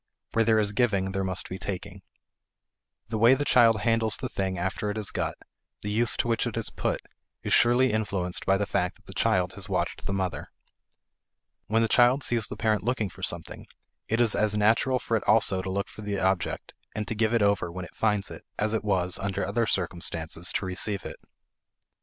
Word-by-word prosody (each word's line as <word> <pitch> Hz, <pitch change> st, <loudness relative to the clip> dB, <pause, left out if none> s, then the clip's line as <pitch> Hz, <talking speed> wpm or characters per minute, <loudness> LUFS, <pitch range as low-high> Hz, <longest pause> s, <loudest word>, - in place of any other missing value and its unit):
Where 115 Hz, -, +2 dB
there 110 Hz, 0 st, +3 dB
is 105 Hz, -2 st, +2 dB
giving 100 Hz, -5 st, +1 dB
there 95 Hz, 0 st, -2 dB
must 95 Hz, -1 st, +3 dB
be 95 Hz, -, -7 dB
taking. 100 Hz, 0 st, -6 dB, 1.1 s
The 110 Hz, -1 st, -2 dB
way 120 Hz, +4 st, +6 dB
the 145 Hz, +2 st, -2 dB
child 115 Hz, -5 st, +5 dB
handles 115 Hz, -2 st, +2 dB
the -, -, -5 dB
thing 95 Hz, -1 st, -2 dB
after 95 Hz, +4 st, -2 dB
it 105 Hz, -, -3 dB
is 105 Hz, -3 st, -2 dB
got, -, -, -2 dB, 0.5 s
the 105 Hz, -, -3 dB
use 115 Hz, +2 st, +3 dB
to -, -, 0 dB
which 115 Hz, -1 st, 0 dB
it -, -, -4 dB
is -, -, -3 dB
put, -, -, -2 dB, 0.4 s
is -, -, -1 dB
surely 120 Hz, 0 st, +4 dB
influenced 95 Hz, -5 st, -1 dB
by 95 Hz, 0 st, +4 dB
the 100 Hz, -, -1 dB
fact 90 Hz, -1 st, -1 dB
that -, -, -27 dB
the -, -, -11 dB
child 90 Hz, -1 st, +1 dB
has 95 Hz, +1 st, -4 dB
watched 95 Hz, -, -2 dB
the -, -, -2 dB
mother. 90 Hz, -6 st, -3 dB, 1.2 s
When 115 Hz, +1 st, +2 dB
the -, -, +2 dB
child 125 Hz, +4 st, +4 dB
sees 115 Hz, -3 st, +2 dB
the -, -, -7 dB
parent 110 Hz, -1 st, +1 dB
looking 110 Hz, -4 st, -1 dB
for 95 Hz, -, -14 dB
something, 85 Hz, -3 st, -5 dB, 0.4 s
it 115 Hz, -, 0 dB
is 120 Hz, -3 st, +4 dB
as 105 Hz, 0 st, +1 dB
natural 115 Hz, +5 st, +3 dB
for 115 Hz, -, -2 dB
it -, -, -5 dB
also 100 Hz, -4 st, +3 dB
to 95 Hz, -, -5 dB
look 100 Hz, +1 st, -2 dB
for -, -, -12 dB
the 100 Hz, -1 st, -3 dB
object 95 Hz, -2 st, -1 dB, 0.2 s
and 105 Hz, -1 st, -3 dB
to -, -, -1 dB
give 110 Hz, 0 st, +1 dB
it 115 Hz, -, +3 dB
over 100 Hz, -4 st, +1 dB
when 90 Hz, +1 st, -6 dB
it -, -, -15 dB
finds 105 Hz, -3 st, 0 dB
it, -, -, -10 dB
as 105 Hz, +1 st, 0 dB
it 110 Hz, -, -1 dB
was, 95 Hz, -3 st, +1 dB
under 100 Hz, -1 st, -2 dB
other 110 Hz, +4 st, 0 dB
circumstances, 85 Hz, -2 st, -2 dB
to 100 Hz, -, -1 dB
receive 95 Hz, +1 st, -1 dB
it. -, -, -7 dB
105 Hz, 210 wpm, -27 LUFS, 95-110 Hz, 1.2 s, way